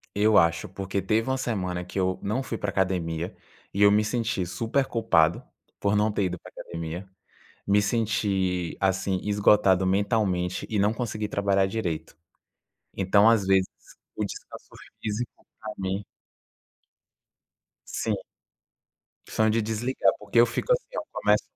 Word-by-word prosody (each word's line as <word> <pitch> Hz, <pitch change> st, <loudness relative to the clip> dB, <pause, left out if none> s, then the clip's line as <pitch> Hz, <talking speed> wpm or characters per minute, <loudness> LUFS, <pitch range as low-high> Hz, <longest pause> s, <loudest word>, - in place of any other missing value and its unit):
Eu 105 Hz, +1 st, +4 dB
acho 85 Hz, 0 st, +3 dB
porque 95 Hz, +1 st, -3 dB
teve 110 Hz, +5 st, +1 dB
uma 130 Hz, -, +1 dB
semana 90 Hz, -8 st, -2 dB
que 90 Hz, +2 st, -5 dB
eu 95 Hz, 0 st, 0 dB
não 110 Hz, +7 st, -1 dB
fui 120 Hz, -, -4 dB
para 105 Hz, -, -3 dB
a -, -, -2 dB
academia 90 Hz, -3 st, -1 dB, 0.4 s
e 100 Hz, -, -1 dB
eu 100 Hz, -, +7 dB
me 105 Hz, +1 st, +3 dB
senti 110 Hz, -4 st, -1 dB
super 115 Hz, +9 st, 0 dB
culpado 85 Hz, -10 st, +2 dB, 0.4 s
por 100 Hz, 0 st, +1 dB
não 105 Hz, +1 st, +2 dB
ter 100 Hz, -1 st, 0 dB
ido 90 Hz, -1 st, -2 dB
para -, -, -13 dB
a -, -, -7 dB
academia. 85 Hz, +3 st, -6 dB, 0.6 s
Me 100 Hz, +1 st, +4 dB
senti, 100 Hz, -5 st, 0 dB
assim, 95 Hz, 0 st, +1 dB
esgotado 100 Hz, -2 st, +4 dB
mentalmente 95 Hz, -2 st, 0 dB
e 105 Hz, -, -1 dB
não 105 Hz, +2 st, +3 dB
consegui 110 Hz, -3 st, -3 dB
trabalhar 100 Hz, -1 st, +2 dB
direito. 85 Hz, -6 st, -3 dB, 0.8 s
Então, 100 Hz, +3 st, +4 dB
às 110 Hz, -4 st, +3 dB
vezes, 95 Hz, -1 st, +4 dB, 0.5 s
o -, -, -1 dB
descanso -, -, -9 dB, 0.3 s
físico 110 Hz, +3 st, -4 dB, 0.2 s
para 110 Hz, -1 st, -6 dB
mim 95 Hz, +1 st, -3 dB, 1.8 s
Sim. -, -, -1 dB, 1.1 s
São 110 Hz, 0 st, +2 dB
de 115 Hz, +1 st, +2 dB
desligar 110 Hz, -1 st, +1 dB
porque 105 Hz, +3 st, +1 dB
eu 120 Hz, -, +8 dB
fico 120 Hz, -, -2 dB
assim, -, -, -2 dB
eu -, -, -3 dB
começo -, -, +2 dB
100 Hz, 150 wpm, -26 LUFS, 95-110 Hz, 1.8 s, eu